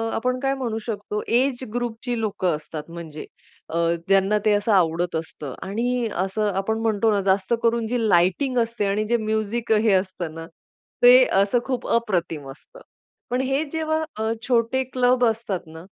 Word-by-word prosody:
आपण 255 +2 -1
काय 270 0 0
म्हणू 235 -4 -3
शकतो 210 -1 -3 0.2
एज 260 -1 0
ग्रुपची 240 0 -3
लोक 200 -3 -3
असतात 155 -1 -3
म्हणजे 165 -3 -8 0.4
अ, 165 - -3 0.3
ज्यांना 195 +2 +3
ते 215 - +4
असं 205 +2 +1
आवडत 175 -2 +2
असतं 155 -4 -5
आणि 240 +3 -1 0.2
असं 205 +1 -1
आपण 220 +3 -1
म्हणतो 220 0 +2
ना 200 -1 +1
जास्त 195 +4 0
करून 230 -1 +1
जी 235 -2 0
लाइटिंग 190 +10 +2
असते 230 -2 -3
आणि 210 +2 0
जे 240 - +3
म्युझिक 220 +1 -2
हे 215 -1 +4
असतं 185 -4 -1
ना, 165 0 -7 0.6
ते - - +9 0.2
असं 205 +5 +2
खूप 255 -2 -3
अप्रतिम 175 - -1
असतं. - - -16 0.5
पण 250 +1 0
हे 270 +3 0
जेव्हा 315 0 -1
अ, 220 +1 -1 0.2
छोटे, 245 +2 +2
क्लब 250 -1 +2
असतात 220 -5 -1
ना, 160 +2 -11
220 Hz, 165 wpm, -23 LUFS, 190-245 Hz, 0.6 s, ते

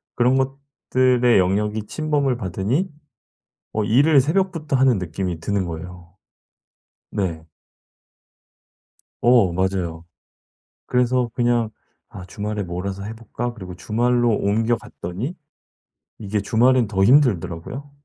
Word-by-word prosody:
그런 125 +2 +3
것들의 130 -3 +1
영역이 105 +4 0
침범을 145 -4 0
받으니 105 - -1 0.8
어 110 - 0
일을 140 +7 +5
새벽부터 160 -1 0
하는 130 -4 +4
느낌이 90 -1 -4
드는 100 +3 -1
거예요 85 +1 -8 1.0
네. 85 -6 -3 1.7
어. 120 -7 +5
맞아요. 90 -2 -2 0.8
그래서 125 0 +1
그냥 120 -2 +1 0.4
'아 90 - -9
주말에 105 +2 -4
몰아서 95 +2 -5
해 105 +2 -5
볼까?' 120 +2 -5
그리고 95 -6 -9
주말로 120 +4 +1
옮겨 110 +3 +1
갔더니 110 - -6 0.8
이게 105 0 -2
주말엔 120 +4 +3
더 95 -2 0
힘들더라고요. 120 - +2
110 Hz, 245 characters per minute, -22 LUFS, 95-125 Hz, 1.7 s, 일을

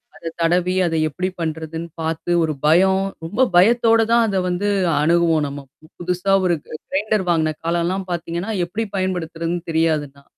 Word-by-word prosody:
அத 165 - -7
தடவி 180 +2 +2
அத 165 - -2
எப்படி 180 +5 -3
பண்றதுன்னு 160 +1 -4
பாத்து 160 +2 -3
ஒரு 155 -1 -1
பயம் 190 +5 +4 0.2
ரொம்ப 205 +10 -2
பயத்தோட 225 +4 +5
தான் 235 -1 +5
அத 195 -2 -1
வந்து 180 +3 -1 0.3
அணுகுவோம் 165 -1 +2
நம்ம 140 +1 -7 0.4
புதுசா 180 +2 -1
ஒரு 175 -1 +2
க - - -22 0.2
கிரைண்டர் 210 +1 0
வாங்குன 160 -2 +1
காலம்லாம் 175 +3 -1
பாத்தீங்கன்னா, 170 +4 -3
எப்படி 210 +6 -3
பயன்படுத்துறதுன்னு 175 -2 -2
தெரியாது 160 -2 +1
தா 140 - -19
170 Hz, 150 wpm, -20 LUFS, 160-190 Hz, 0.4 s, பயத்தோட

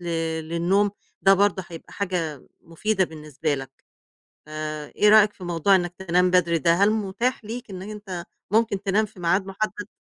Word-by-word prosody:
ل - - -11 0.4
للنوم، 185 +5 +2 0.3
ده 195 0 +7
برضه 195 -2 +1
هيبقى 165 -1 -11
حاجة 170 -8 -3
مفيدة 190 +4 0
بالنسبة 155 -2 -3
لك. 135 -1 -6 0.8
فإيه 155 +6 -1
رأيك 215 -1 +6
في 185 - -12
موضوع 175 +3 +3
إنّك 175 -1 0
تنام 180 -1 +2
بدري 170 -2 +3
ده، 170 +1 +3
هل 200 +4 +4
متاح 220 +5 -1
ليك 235 +1 -6
إنّك 190 +1 -7
أنت 200 -5 -7 0.3
ممكن 220 -3 +2
تنام 210 +2 +2
في 200 -3 -16
ميعاد 185 +3 +1
مُحدّد؟ 205 +1 -4
190 Hz, 160 wpm, -24 LUFS, 170-205 Hz, 0.8 s, ده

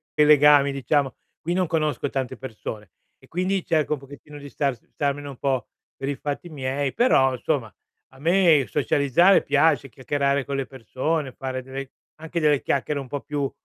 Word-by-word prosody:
legami 150 -1 +6
diciamo, 140 +1 0 0.3
qui 170 +2 -2
non 185 0 +1
conosco 155 -3 -1
tante 130 -2 -3
persone, 110 -6 -8 0.3
e - - -21
quindi 185 +2 -1
cerco 155 -2 +1
un 150 - -3
pochettino 145 +2 -12
di 145 0 -10
stars 135 -5 -2
starmene 145 0 -2
un 135 -3 -8
po' 135 -2 -1 0.3
per 135 - -4
i 145 - -1
fatti 145 +5 -5
miei, 135 -1 -2
però, 135 - +4
insomma, 125 - -2 0.4
a 130 - -19
me 165 -3 +4
socializzare 150 +6 +3
piace, 145 -1 +2
chiacchierare 140 +2 -1
con 140 - -3
le 135 - -2
persone, 135 +4 -3
fare 130 -1 -5
delle 135 +1 -7 0.3
anche 160 +2 -4
delle 150 -3 +3
chiacchiere 140 +1 -1
un 135 - -7
po' 145 +2 -4
più 145 -2 -3
140 Hz, 170 wpm, -24 LUFS, 135-150 Hz, 0.4 s, legami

